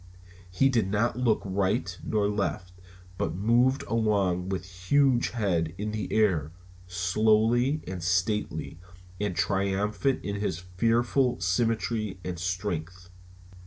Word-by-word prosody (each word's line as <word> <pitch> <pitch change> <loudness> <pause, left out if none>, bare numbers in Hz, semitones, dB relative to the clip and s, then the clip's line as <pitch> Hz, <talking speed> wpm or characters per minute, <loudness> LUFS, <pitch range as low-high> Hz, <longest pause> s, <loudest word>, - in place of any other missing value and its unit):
He 90 +9 +3
did 115 -7 +1
not 115 +4 0
look 120 -4 +2
right 95 -2 0
nor 105 -2 +1
left, 100 -3 -2 0.5
but 80 - -1
moved 120 +7 +2
along 100 -5 0
with 95 -1 -3 0.2
huge 135 -2 +3
head 90 -8 -1
in 105 +1 -3
the 105 -3 -4
air, 90 -9 +2 0.4
slow 105 +5 +2
and 120 - -1
stately, 90 +1 -1 0.4
and 100 -3 -2
triumphant 100 +9 0
in 100 0 -2
his 100 -5 -2
fearful 115 +8 +1
symmetry 110 +2 0
and 90 -2 -4
strength. 90 0 -4
100 Hz, 120 wpm, -27 LUFS, 90-115 Hz, 0.5 s, He